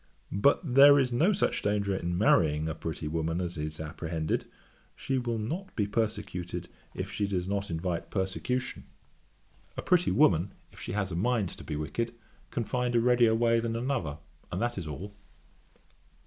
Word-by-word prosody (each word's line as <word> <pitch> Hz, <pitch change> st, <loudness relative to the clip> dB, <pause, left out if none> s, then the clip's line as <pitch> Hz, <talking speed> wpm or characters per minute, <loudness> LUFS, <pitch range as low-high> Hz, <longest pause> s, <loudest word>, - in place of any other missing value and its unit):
But 100 Hz, +9 st, +4 dB
there 140 Hz, +2 st, +9 dB
is 130 Hz, -3 st, +2 dB
no 155 Hz, +12 st, +3 dB
such 205 Hz, -, +1 dB
danger 100 Hz, -1 st, 0 dB
in 85 Hz, -1 st, -2 dB
marrying 80 Hz, -6 st, +3 dB
a 80 Hz, -, -2 dB
pretty 80 Hz, -1 st, -5 dB
woman 80 Hz, +2 st, -1 dB
as 90 Hz, -1 st, -3 dB
is 75 Hz, -1 st, -4 dB
apprehended: 80 Hz, 0 st, -2 dB, 0.5 s
she 135 Hz, -1 st, -1 dB
will 120 Hz, -2 st, -2 dB
not 170 Hz, -, -4 dB
be 105 Hz, -, +1 dB
persecuted 105 Hz, -5 st, -3 dB, 0.3 s
if -, -, -4 dB
she 100 Hz, -, -1 dB
does 90 Hz, -2 st, -1 dB
not 100 Hz, 0 st, -2 dB
invite 85 Hz, +1 st, -3 dB
persecution. 110 Hz, +6 st, -2 dB, 0.9 s
A -, -, -3 dB
pretty 180 Hz, -1 st, +3 dB
woman, 95 Hz, -, +3 dB, 0.2 s
if -, -, -15 dB
she -, -, -5 dB
has 100 Hz, -2 st, -1 dB
a -, -, -3 dB
mind 110 Hz, 0 st, +1 dB
to -, -, -9 dB
be 75 Hz, -, -4 dB
wicked, 75 Hz, +11 st, -3 dB, 0.3 s
can 120 Hz, -, -2 dB
find 125 Hz, +2 st, -1 dB
a -, -, +6 dB
readier 120 Hz, -1 st, +4 dB
way 115 Hz, 0 st, +3 dB
than 115 Hz, 0 st, -2 dB
another; 120 Hz, -, -2 dB, 0.3 s
and -, -, -2 dB
that 120 Hz, +1 st, 0 dB
is 90 Hz, -5 st, -5 dB
all.' 95 Hz, +7 st, -6 dB
100 Hz, 175 wpm, -29 LUFS, 85-120 Hz, 0.9 s, there